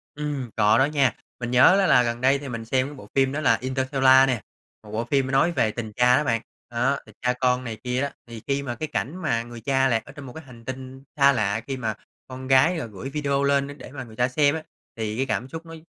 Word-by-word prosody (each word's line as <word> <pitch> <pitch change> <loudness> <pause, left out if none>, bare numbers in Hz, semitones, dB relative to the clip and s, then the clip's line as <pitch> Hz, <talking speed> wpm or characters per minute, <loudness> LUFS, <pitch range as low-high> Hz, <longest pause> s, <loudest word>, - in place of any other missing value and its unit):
Ừm, 145 -5 -4
có 110 +1 +4
đó 130 - +5
nha. 140 -4 +1 0.2
Mình 120 0 -4
nhớ 180 +10 +6
á 190 - +3
là 125 - +5
gần 120 +1 -3
đây 135 +2 +3
thì 140 -2 -7
mình 115 -1 -5
xem 130 +3 +1
cái 145 - -9
bộ - - -12
phim 135 -1 +3
đó 150 +2 -3
là 115 -5 +4
"Interstellar" 130 0 +4
nè. 125 -5 -1 0.4
Một 105 - -12
bộ 115 +2 -2
phim 135 +1 +1
m - - -4
nói 165 +6 +3
về 110 -9 +1
tình 110 -2 -6
cha 125 +2 +4
đó 150 - +1
bạn, 115 -4 0 0.3
đó, 130 +4 +1
tình - - -17
cha 125 0 +1
con 125 0 +1
này 115 -3 -5
kia 125 +1 -1
đó. 140 - 0 0.2
Thì 115 -2 -9
khi 140 0 0
mà 120 -3 -4
cái 155 +5 -4
cảnh 150 +2 -3
mà 115 -7 0
người 120 -1 -10
cha 135 +2 +2
lạc 115 -3 0
ở - - -11
trong 145 -1 -10
một 125 - -10
cái 160 - -9
hành 120 -3 -15
tinh 130 +1 -7
xa 140 0 +6
lạ, 105 -1 0
khi 135 -1 -3
mà 110 -3 -2 0.3
con 130 0 -8
gái 135 +7 +4
là 155 - -3
gửi 110 +5 -8
video 140 -1 -1
lên 140 +1 +1
để - - -11
mà 130 -2 -7
người 110 -2 -13
cha 125 +1 +2
xem 145 +3 +2
ấy, 160 - -5 0.3
thì 110 0 -3
cái 135 - 0
cảm 125 0 -2
xúc 165 +3 -8
nó 165 0 -10
130 Hz, 275 wpm, -24 LUFS, 120-140 Hz, 0.4 s, nhớ